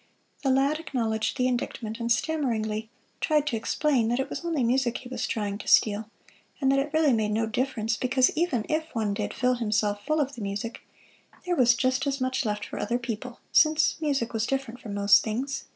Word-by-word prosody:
The 275 Hz, -, 0 dB
lad 275 Hz, +4 st, +2 dB
acknowledged 225 Hz, -9 st, -2 dB
the 255 Hz, -1 st, +2 dB
indictment, 240 Hz, -2 st, -3 dB
and 235 Hz, 0 st, -2 dB
stammeringly 225 Hz, -6 st, 0 dB, 0.3 s
tried 300 Hz, -1 st, +2 dB
to 270 Hz, -, -1 dB
explain 245 Hz, +2 st, +1 dB
that 240 Hz, +2 st, 0 dB
it 265 Hz, -, -2 dB
was -, -, -5 dB
only 325 Hz, -6 st, 0 dB
music 245 Hz, 0 st, +1 dB
he 250 Hz, -, -11 dB
was 255 Hz, -, -3 dB
trying 205 Hz, -2 st, -2 dB
to -, -, -9 dB
steal; 215 Hz, 0 st, +3 dB, 0.5 s
and 270 Hz, -1 st, +3 dB
that 275 Hz, -, +3 dB
it 280 Hz, +2 st, -1 dB
really 310 Hz, -4 st, +3 dB
made 215 Hz, -2 st, +1 dB
no 225 Hz, +1 st, +1 dB
difference 225 Hz, -1 st, -1 dB
because 255 Hz, 0 st, +2 dB
even 305 Hz, -10 st, 0 dB
if 315 Hz, -1 st, -2 dB
one 215 Hz, -3 st, 0 dB
did -, -, -3 dB
fill 250 Hz, +1 st, +1 dB
himself 210 Hz, -2 st, 0 dB
full 310 Hz, +4 st, 0 dB
of 280 Hz, -1 st, 0 dB
the 235 Hz, -, -8 dB
music, 200 Hz, +3 st, -4 dB, 0.6 s
there 355 Hz, -1 st, 0 dB
was 245 Hz, -4 st, +5 dB
just 260 Hz, +2 st, 0 dB
as 275 Hz, 0 st, -1 dB
much 260 Hz, 0 st, -1 dB
left 210 Hz, -1 st, -2 dB
for -, -, -7 dB
other 235 Hz, +4 st, 0 dB
people, 240 Hz, 0 st, -6 dB
since 310 Hz, 0 st, +4 dB
music 275 Hz, -7 st, 0 dB
was 225 Hz, 0 st, 0 dB
different 265 Hz, -3 st, -3 dB
from 205 Hz, -3 st, -7 dB
most 200 Hz, 0 st, +5 dB
things. 260 Hz, +5 st, -3 dB
245 Hz, 205 wpm, -27 LUFS, 220-275 Hz, 0.6 s, was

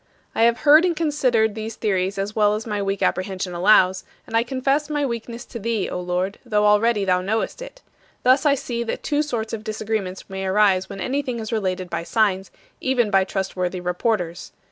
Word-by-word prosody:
I 225 Hz, -, +3 dB
have 235 Hz, 0 st, +2 dB
heard 305 Hz, +2 st, +7 dB
and 355 Hz, -2 st, +1 dB
considered 255 Hz, -9 st, +1 dB
these 220 Hz, +1 st, -6 dB
theories 195 Hz, -2 st, -1 dB
as 195 Hz, +2 st, -3 dB
well 210 Hz, -1 st, +3 dB
as 215 Hz, -, -5 dB
my 210 Hz, -2 st, -2 dB
weak 195 Hz, 0 st, -1 dB
apprehension 185 Hz, -1 st, -1 dB
allows, 185 Hz, 0 st, +4 dB, 0.2 s
and 225 Hz, -, -6 dB
I 230 Hz, -, +5 dB
confess 270 Hz, +4 st, 0 dB
my 295 Hz, -1 st, 0 dB
weakness 235 Hz, -1 st, -5 dB
to 235 Hz, -, -8 dB
Thee, 225 Hz, -2 st, -1 dB
O -, -, -3 dB
Lord, 180 Hz, +2 st, -2 dB
though 210 Hz, -4 st, +1 dB
already 210 Hz, 0 st, +3 dB
thou 180 Hz, -1 st, +2 dB
knowest 220 Hz, -, -2 dB
it. -, -, -10 dB, 0.4 s
Thus 260 Hz, +2 st, +4 dB
I 290 Hz, -2 st, +4 dB
see 240 Hz, -3 st, -4 dB
that 235 Hz, -, -4 dB
two 295 Hz, -1 st, +1 dB
sorts 235 Hz, -7 st, -3 dB
of 220 Hz, -1 st, -4 dB
disagreements 215 Hz, -3 st, -3 dB
may 190 Hz, 0 st, -4 dB
arise 190 Hz, -1 st, +3 dB
when 195 Hz, -1 st, -7 dB
anything 255 Hz, +3 st, -2 dB
is 220 Hz, -1 st, -5 dB
related 185 Hz, -4 st, -1 dB
by 170 Hz, -1 st, -3 dB
signs, 195 Hz, 0 st, 0 dB, 0.3 s
even 245 Hz, -5 st, +1 dB
by 195 Hz, -1 st, +4 dB
trustworthy 185 Hz, -1 st, -3 dB
reporters. 180 Hz, -1 st, -2 dB
215 Hz, 195 wpm, -22 LUFS, 190-235 Hz, 0.4 s, heard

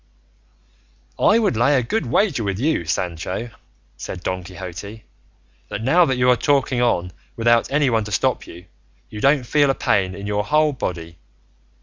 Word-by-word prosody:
"I 210 Hz, -, +4 dB
would 215 Hz, -, +1 dB
lay 135 Hz, +5 st, +3 dB
a 125 Hz, -, +1 dB
good 220 Hz, -, -2 dB
wager 180 Hz, -, +1 dB
with 100 Hz, -2 st, -2 dB
you, 135 Hz, -, 0 dB
Sancho," 90 Hz, +7 st, -3 dB, 0.5 s
said 90 Hz, -, -7 dB
Don 90 Hz, 0 st, -3 dB
Quixote, 95 Hz, +4 st, -9 dB, 0.7 s
"that -, -, -5 dB
now 170 Hz, +8 st, +4 dB
that 130 Hz, -4 st, -1 dB
you 125 Hz, 0 st, +2 dB
are -, -, +5 dB
talking 135 Hz, -1 st, +1 dB
on 90 Hz, -7 st, +1 dB, 0.2 s
without 120 Hz, +1 st, +2 dB
anyone 135 Hz, -6 st, +2 dB
to 105 Hz, -, -8 dB
stop 100 Hz, -, 0 dB
you, 90 Hz, +2 st, -12 dB, 0.5 s
you 105 Hz, -, -7 dB
don't 140 Hz, +1 st, +3 dB
feel 145 Hz, +3 st, +2 dB
a 135 Hz, -, +2 dB
pain 95 Hz, -2 st, 0 dB
in 100 Hz, -, -8 dB
your 105 Hz, 0 st, -1 dB
whole 150 Hz, +5 st, +2 dB
body. 85 Hz, -8 st, -5 dB
115 Hz, 165 wpm, -21 LUFS, 95-140 Hz, 0.7 s, are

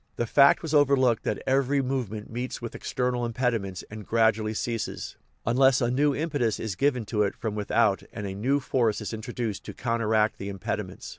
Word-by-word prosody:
The 120 Hz, -, -1 dB
fact 140 Hz, +7 st, +5 dB
was 160 Hz, -2 st, -3 dB
overlooked 135 Hz, -5 st, +4 dB
that -, -, -2 dB
every 135 Hz, +1 st, +2 dB
movement 125 Hz, -6 st, -2 dB
meets 125 Hz, +2 st, -4 dB
with 120 Hz, -1 st, -6 dB
external 125 Hz, -1 st, -2 dB
impediments 115 Hz, -6 st, -1 dB
and 110 Hz, 0 st, -7 dB
gradually 110 Hz, 0 st, +2 dB
ceases, 115 Hz, 0 st, -3 dB, 0.3 s
un 120 Hz, -, +1 dB
less 135 Hz, -1 st, +5 dB
a 120 Hz, -1 st, +1 dB
new 140 Hz, +2 st, +2 dB
impetus 145 Hz, -8 st, -1 dB
is 110 Hz, -3 st, -3 dB
given 125 Hz, 0 st, +1 dB
to 105 Hz, 0 st, -1 dB
it 100 Hz, -, +1 dB
from 110 Hz, -2 st, -4 dB
without 105 Hz, -1 st, +1 dB
and 105 Hz, -, -6 dB
a 95 Hz, -, -4 dB
new 130 Hz, +9 st, +1 dB
force 120 Hz, -5 st, +1 dB
is 105 Hz, +1 st, -5 dB
introduced 110 Hz, -1 st, -4 dB
to -, -, -8 dB
counteract 110 Hz, -2 st, +1 dB
the 100 Hz, -, -5 dB
impediments. 95 Hz, -2 st, -5 dB
115 Hz, 190 wpm, -27 LUFS, 110-130 Hz, 0.3 s, fact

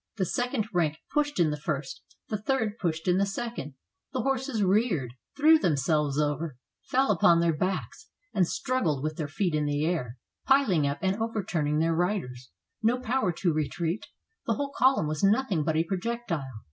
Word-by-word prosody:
The 190 Hz, -, +1 dB
second 245 Hz, +2 st, -1 dB
rank 160 Hz, -3 st, +1 dB, 0.2 s
pushed 295 Hz, -4 st, 0 dB
in 160 Hz, -3 st, +4 dB
the 150 Hz, -, -4 dB
first, 140 Hz, -3 st, -3 dB, 0.3 s
the 215 Hz, -, -2 dB
third 225 Hz, -3 st, -1 dB
pushed 160 Hz, -3 st, -2 dB
in 180 Hz, +1 st, +3 dB
the 200 Hz, -, +3 dB
second, 195 Hz, -, -5 dB, 0.4 s
the 255 Hz, -4 st, -1 dB
horses 265 Hz, -4 st, 0 dB
reared, 185 Hz, -, +1 dB, 0.2 s
threw 310 Hz, +2 st, +6 dB
themselves 150 Hz, -, +1 dB
over, 150 Hz, -1 st, -1 dB, 0.2 s
fell 265 Hz, -2 st, +1 dB
upon 170 Hz, -3 st, +5 dB
their 170 Hz, -1 st, +2 dB
backs 185 Hz, +5 st, -3 dB, 0.2 s
and 185 Hz, -4 st, +3 dB
struggled 170 Hz, -, -1 dB
with 155 Hz, 0 st, -2 dB
their 155 Hz, -, -2 dB
feet 175 Hz, +3 st, -1 dB
in 150 Hz, -1 st, +1 dB
the 145 Hz, +1 st, 0 dB
air, 135 Hz, -8 st, -2 dB, 0.3 s
piling 230 Hz, -, +4 dB
up 140 Hz, +1 st, -1 dB
and 190 Hz, +1 st, +1 dB
overturning 180 Hz, -10 st, -1 dB
their 165 Hz, +1 st, +2 dB
riders, 160 Hz, -9 st, -2 dB, 0.3 s
no 235 Hz, +3 st, +2 dB
power 250 Hz, -5 st, 0 dB
to 170 Hz, 0 st, 0 dB
retreat; 165 Hz, +4 st, -2 dB, 0.4 s
the 230 Hz, -, +2 dB
whole 280 Hz, +4 st, -3 dB
column 260 Hz, -9 st, +4 dB
was 150 Hz, +2 st, -3 dB
nothing 205 Hz, -, +2 dB
but 155 Hz, +1 st, 0 dB
a 160 Hz, -, +3 dB
projectile. 190 Hz, -, -3 dB
180 Hz, 175 wpm, -28 LUFS, 150-225 Hz, 0.4 s, threw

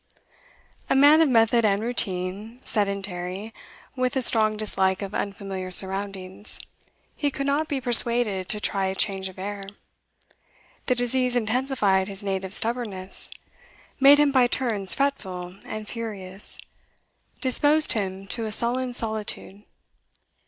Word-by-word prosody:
A -, -, +2 dB
man 290 Hz, +4 st, +7 dB
of 320 Hz, -, +4 dB
method 230 Hz, -1 st, +3 dB
and 200 Hz, -2 st, +2 dB
routine, 210 Hz, 0 st, -2 dB
sedentary, 200 Hz, 0 st, -2 dB, 0.4 s
with 255 Hz, +1 st, -1 dB
a 265 Hz, -, +3 dB
strong 215 Hz, -2 st, +3 dB
dislike 190 Hz, -2 st, 0 dB
of 195 Hz, 0 st, -7 dB
unfamiliar 195 Hz, -2 st, -4 dB
surroundings, 190 Hz, +1 st, -1 dB, 0.6 s
he 290 Hz, -, 0 dB
could 275 Hz, 0 st, -4 dB
not 285 Hz, +3 st, 0 dB
be 280 Hz, -3 st, -2 dB
persuaded 235 Hz, -5 st, +3 dB
to 210 Hz, -, 0 dB
try 195 Hz, -2 st, 0 dB
change 195 Hz, -1 st, -1 dB
of 185 Hz, -, -15 dB
air. 200 Hz, +1 st, -5 dB, 1.2 s
The 250 Hz, -, +2 dB
disease 250 Hz, +1 st, +1 dB
intensified 220 Hz, -5 st, +1 dB
his 200 Hz, 0 st, -6 dB
native 190 Hz, 0 st, -2 dB
stubbornness, 220 Hz, -5 st, -2 dB, 0.7 s
made 275 Hz, +1 st, +8 dB
him 295 Hz, -1 st, +3 dB
by 255 Hz, -3 st, +4 dB
turns 220 Hz, -7 st, 0 dB
fretful 190 Hz, -10 st, -3 dB
and 215 Hz, -1 st, -6 dB
furious, 200 Hz, -4 st, -3 dB, 0.8 s
disposed 290 Hz, +4 st, +3 dB
him 195 Hz, -3 st, -3 dB
to 230 Hz, +1 st, -2 dB
a 215 Hz, -, -4 dB
sullen 245 Hz, +3 st, +1 dB
solitude. 215 Hz, -3 st, -4 dB
215 Hz, 125 wpm, -24 LUFS, 195-250 Hz, 1.2 s, made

